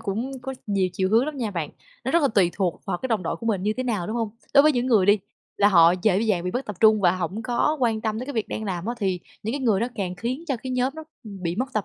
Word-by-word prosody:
cũng 225 +6 -3
có 265 +1 -5
nhiều 195 -2 +1
chiều 185 +1 0
hướng 230 +4 +4
lắm 300 -1 -5
nha 235 -5 -2
bạn. 170 -6 -3 0.3
Nó - - -1
rất 340 - +3
là 280 - +4
tùy 190 -6 +3
thuộc 185 -4 -1
vào - - -2
cái 260 - -4
đồng 220 -5 0
đội 165 - -2
của 230 - -7
mình 200 -5 0
như 210 +2 +1
thế 255 - -1
nào, 215 -8 -2
đúng 220 - -3
hông? 225 -3 -1 0.2
Đối 280 - +9
với 305 +1 +5
những 245 -1 0
người 220 -7 +4
đi, 205 +1 +5 0.4
là 205 - +5
họ 170 -4 +6
dễ 200 -3 +3
dàng 210 -6 0
bị 180 - -1
mất 250 +7 -3
tập 210 - -6
trung 215 -1 +6
và 175 -3 +4
hổng 185 +4 -3
có 245 +7 +1
quan 225 -3 +1
tâm 220 -1 -2
tới 250 - -5
cái 285 - -4
việc 225 -4 -2
đang 220 - -4
làm 185 -2 -3
á, 240 - -1
thì 190 -4 -1 0.2
những 220 - -2
cái 285 - -3
người 220 -7 +2
đó 235 - +1
càng 185 -3 -3
khiến 250 - -4
cho 270 - 0
cái 260 - -5
nhóm 255 +1 0
nó 315 - -7 0.2
bị 185 -5 -5
mất 255 +4 0
tập 215 -2 0
215 Hz, 315 wpm, -24 LUFS, 190-245 Hz, 0.4 s, Đối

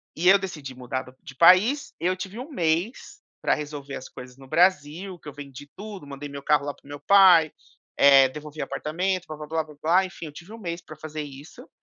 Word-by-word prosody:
E 175 +3 0
eu 195 +1 +7
decidi 150 -9 -7
mudar 130 +1 -4
do 130 0 -16
de 135 -4 -11
país, 195 - +5
eu 185 +2 0
tive 195 +5 -7
1 270 +5 -7
mês 175 - -2 0.2
para - - +2
resolver 145 -2 -6
as 130 - -8
coisas 125 +1 -12
no 135 -1 -14
Brasil, 175 +2 +1
que 150 - -10
eu - - -11
vendi 145 0 -11
tudo, 200 -7 -9
mandei 140 +1 -7
meu 140 0 -9
carro 150 -2 +2
lá 145 - -3
para - - -27
o - - -16
meu 145 0 -8
pai, 180 -3 +6 0.4
eh, 135 -1 +7
devolvi 150 +1 -8
apartamento, 180 +3 -2
blá 155 -1 -7
blá 150 -1 -8
blá 160 0 -1
blá 150 -1 -15
blá 180 +4 +3
enfim, 180 -3 -9
eu 150 - -8
tive 175 +7 -13
1 225 - -10
mês 170 -3 -5
para 155 -2 -12
fazer 155 0 -6
isso, 145 0 -11
155 Hz, 230 wpm, -25 LUFS, 145-185 Hz, 0.4 s, eu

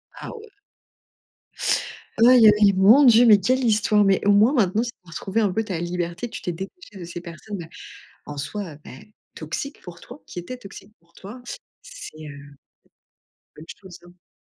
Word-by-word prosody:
Ah - - -9
ouais. 445 0 -12 1.8
Aïe 245 -2 +7
aïe, 210 -1 +5
mon 215 +10 +6
Dieu 240 -1 +6
mais 210 -2 +7
quelle 255 +7 0
histoire 210 -2 +2
mais 195 -1 +3
au 205 - +5
moins 210 +6 +5
maintenant 220 -5 +1
tu 240 - -3 0.2
as - - -17
retrouvé 195 +7 -3
un 205 -4 +1
peu 220 - -1
ta 190 -6 -4
liberté, 175 +5 -4
tu - - -9
t'es 175 - -3
détachée 195 - -10
de - - -8
ces 175 0 -8
personnes 170 +1 -8 0.6
en 150 - -8
soi, 170 +4 -6
heu, - - -14
beh 170 +11 -14 0.2
toxiques 165 - -6
pour 175 -2 -12
toi, 250 +5 -13
qui 175 - -7
étaient 250 +9 -8
toxiques 200 -1 -13
pour 170 0 -33
toi, 210 +9 -11 0.4
c'est, - - -11
heu. - - -9
Une 145 0 -12 1.1
bonne 155 - -12 0.2
chose, 185 -3 -12
hein. 175 0 -23
200 Hz, 185 wpm, -23 LUFS, 175-230 Hz, 1.8 s, Aïe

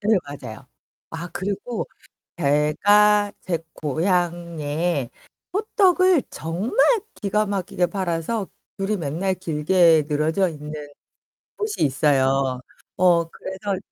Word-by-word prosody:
네 215 0 +3
맞아요. 135 -3 -9 0.5
아 165 +2 -6
그리고 205 +4 -3 0.5
제가 205 +8 +4
제 170 -3 -2
고향에 165 -3 -1 0.4
호떡을 375 - +3
정말 175 - -4 0.4
기가 210 +1 0
막히게 190 -2 -1
팔아서 190 +3 -2 0.3
줄이 200 +2 0
맨날 170 +5 -1
길게 165 -1 +3
늘어져 160 +5 +1
있는 150 -1 -7 0.7
곳이 425 0 -2
있어요. 135 -2 +2 0.4
어 175 -2 +4
그래서 190 +2 -4
175 Hz, 205 characters per minute, -23 LUFS, 150-200 Hz, 0.7 s, 제가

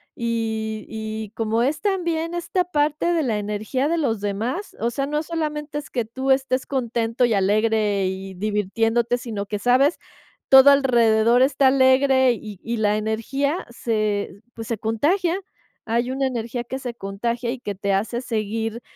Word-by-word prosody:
y 220 -2 -2
y 220 -1 -5
como 225 +1 0
es 290 +4 -1
también 340 -4 -1
esta 360 +1 0
parte 305 0 0
de 330 -3 +1
la 220 -5 0
energía 210 +7 -2
de 335 - +1
los 230 -9 0
demás, 225 - -3
o 230 - 0
sea, 275 +3 -2
no 300 +2 -1
solamente 300 -2 -4
es 295 - -11
que 240 -3 -2
tú 260 +4 -2
estés 265 -1 +1
contento 235 -2 0
y 235 - +1
alegre 210 0 +2
y 190 0 -5
divirtiéndote, 225 +4 0
sino 220 -5 -5
que 210 0 -3
sabes, 255 +8 +3 0.5
todo 265 +1 +9
alrededor 235 -3 +4
está 270 0 +3
alegre 260 -1 +4
y 210 -4 -9
y 230 +1 -2
la 210 -1 +2
energía 270 +9 -1
se, 215 -4 -2
pues, 225 -1 -7
se 230 - -2
contagia, 330 - 0 0.5
hay 235 +3 0
una 270 0 0
energía 240 -1 -3
que 260 +3 -5
se 245 -2 -5
contagia 235 +4 -3
y 255 - -5
que 205 -5 -4
te 200 +1 -1
hace 225 +5 -1
seguir, 225 0 -3
235 Hz, 165 wpm, -22 LUFS, 215-270 Hz, 0.5 s, todo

